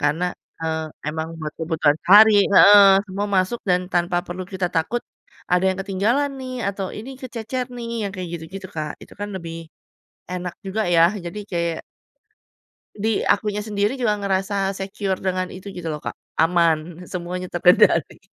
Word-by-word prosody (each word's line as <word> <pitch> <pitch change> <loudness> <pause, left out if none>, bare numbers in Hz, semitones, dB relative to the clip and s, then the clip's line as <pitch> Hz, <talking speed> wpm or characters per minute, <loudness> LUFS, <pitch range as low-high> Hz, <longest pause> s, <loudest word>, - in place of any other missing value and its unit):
Karena, 150 +5 +1 0.4
eee, 160 0 -1 0.2
emang 160 +1 -3
buat 155 -1 -5
kebutuhan 160 -2 +2
sehari 210 +4 +8 0.2
heeh, 205 +1 +9 0.2
semua 200 +2 -3
masuk 185 +6 +1
dan 180 0 +3
tanpa 175 0 +1
perlu 180 +1 -5
kita 185 -1 -1
takut 165 +9 0 0.5
ada 180 +1 +3
yang 190 - -4
ketinggalan 215 +9 0
nih 255 0 -6 0.2
atau 195 -1 -3
ini 230 +5 -8
kececer 250 0 -4
nih 235 -1 -6 0.2
yang 200 - -2
kayak 180 -2 -5
gitu-gitu, 180 +4 -7
Kak, 155 -1 -3
itu - - -14
kan 205 - -3
lebih 165 -2 -7 0.8
enak 180 -1 -4
juga 205 +3 -1
ya. 165 +1 +6
Jadi, 170 +4 -6
kayak 170 -2 -1 1.2
di 215 +1 0
akunya 210 0 +1
sendiri 210 +4 -1
juga 215 -5 0
ngerasa 195 0 -1
secure 195 0 -3
dengan 185 -1 -2
itu 190 +2 -9
gitu 175 -3 -6
loh, 155 - -2
Kak, - - -3 0.2
aman 165 +1 +1
semuanya 180 0 -5
terkendali. 175 +1 +3
185 Hz, 155 wpm, -22 LUFS, 170-205 Hz, 1.2 s, heeh